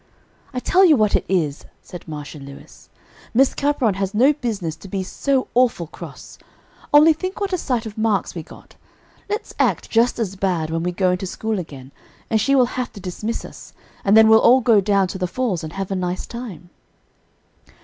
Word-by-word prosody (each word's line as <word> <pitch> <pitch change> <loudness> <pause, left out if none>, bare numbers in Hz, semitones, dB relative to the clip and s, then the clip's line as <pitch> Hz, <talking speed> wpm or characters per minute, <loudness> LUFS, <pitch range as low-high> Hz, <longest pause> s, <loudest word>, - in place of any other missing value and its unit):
"I 250 - -3
tell 370 +9 +3
you 320 -6 +6
what 215 -2 +2
it - - +1
is," 160 -7 0 0.2
said 180 - -11
Marcia 150 -1 -7
Lewis, 140 0 -13 0.5
"Miss 265 +2 +4
Capron 280 -7 +1
has 195 +1 -3
no 260 +7 +5
business 205 - -4
to 195 - -12
be 190 0 -3
so 265 +7 -1
awful 240 -8 +2
cross. - - -11 0.5
Only 305 +2 +7
think 370 +6 -5
what 400 -2 -2
a - - +2
sight 245 -6 -2
of 220 0 -7
marks 215 -4 0
we 170 - -5
got. - - -16 0.5
Let's 420 +2 -4
act - - 0
just 235 +2 +3
as 205 -5 -3
bad 175 -5 -1
when 165 0 -1
we 180 +1 -1
go 185 +1 +1
into 180 +1 -2
school 220 +2 -3
again, 140 -6 -9 0.4
and 220 -1 +2
she 275 +5 +2
will 255 -2 +5
have 250 - -3
to - - -10
dismiss 200 +5 -5
us, - - -12 0.3
and 200 +2 +4
then 220 0 +8
we'll 220 0 +7
all 255 +2 +6
go 225 -4 +4
down 200 -1 +2
to 190 - -6
the 180 - -1
falls 205 -5 -2
and 160 +1 -7
have 195 0 -5
a - - 0
nice 180 0 -3
time." 205 -8 -9
205 Hz, 200 wpm, -21 LUFS, 180-250 Hz, 0.5 s, then